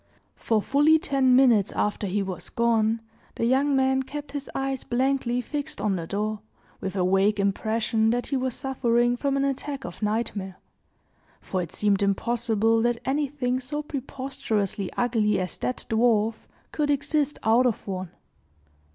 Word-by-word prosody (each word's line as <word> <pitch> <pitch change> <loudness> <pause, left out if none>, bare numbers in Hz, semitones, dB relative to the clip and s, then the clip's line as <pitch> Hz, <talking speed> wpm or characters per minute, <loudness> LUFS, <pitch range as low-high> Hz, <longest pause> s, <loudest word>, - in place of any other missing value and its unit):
For 220 -3 0
fully 295 +3 +4
ten 270 -6 +2
minutes 235 -7 +5
after 210 0 -1
he 200 +2 0
was 180 -3 -6
gone, 230 -1 +1 0.3
the 230 - -1
young 270 +3 +3
man 265 0 +2
kept 290 +2 -7
his 285 -1 -5
eyes 270 -1 -2
blankly 250 -1 0
fixed 295 +4 -5
on 205 -2 0
the 165 -2 -4
door, 210 +2 -2 0.4
with 190 0 -4
a 185 -2 +1
vague 195 +3 +2
impression 220 +2 +1
that 245 +1 0
he 280 - -2
was 260 -2 -1
suffering 240 -2 +1
from 275 +2 -1
an 275 - +1
attack 275 +1 -3
of 175 - -8
nightmare; 210 -3 -2 0.8
for 185 - -3
it 170 -1 -6
seemed 205 0 +1
impossible 225 +2 +1
that 240 0 +1
anything 265 -2 0
so 295 +4 -4
preposterously 255 - -3
ugly 220 -4 +2
as 185 -1 -3
that 250 - -3
dwarf 225 -1 +3 0.4
could 295 -1 -1
exist 290 +1 0
out 235 +3 +4
of 235 - -2
one. 185 -2 -4
240 Hz, 155 wpm, -25 LUFS, 210-270 Hz, 0.8 s, minutes